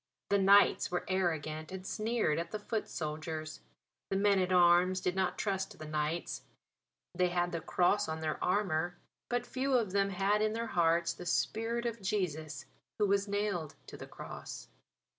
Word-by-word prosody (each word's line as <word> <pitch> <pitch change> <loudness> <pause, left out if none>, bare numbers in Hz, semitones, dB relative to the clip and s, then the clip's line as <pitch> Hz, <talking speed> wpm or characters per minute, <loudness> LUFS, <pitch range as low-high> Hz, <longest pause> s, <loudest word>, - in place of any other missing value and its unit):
The 200 - +4
knights 200 +1 +5
were 175 0 -2
arrogant 160 -4 -1
and 190 0 -7
sneered 215 -7 0
at 170 0 -4
the 215 - -3
foot 215 +1 -3
soldiers; 155 0 -4 0.5
the - - -1
men 200 0 +3
at 185 0 0
arms 180 +1 +5
did 180 0 -1
not 185 -1 0
trust 195 -2 -2
the 155 - -8
knights. 155 +2 -2 0.7
They 180 0 +2
had 175 0 0
the 170 - -3
Cross 200 +2 +2
on 160 0 -3
their 155 -1 -3
armour; 175 -3 0 0.3
but 245 0 0
few 265 +2 -1
of 230 -6 +2
them 200 0 +2
had 195 +2 +1
in 215 0 +1
their 230 +1 -2
hearts 170 -4 +2
the 175 - -9
spirit 230 +6 0
of 230 -2 -3
Jesus 160 -8 -2 0.3
who 210 - +3
was 200 0 +2
nailed 200 -6 -2
to - - -10
the - - -9
Cross. - - -8
185 Hz, 175 wpm, -32 LUFS, 170-205 Hz, 0.7 s, knights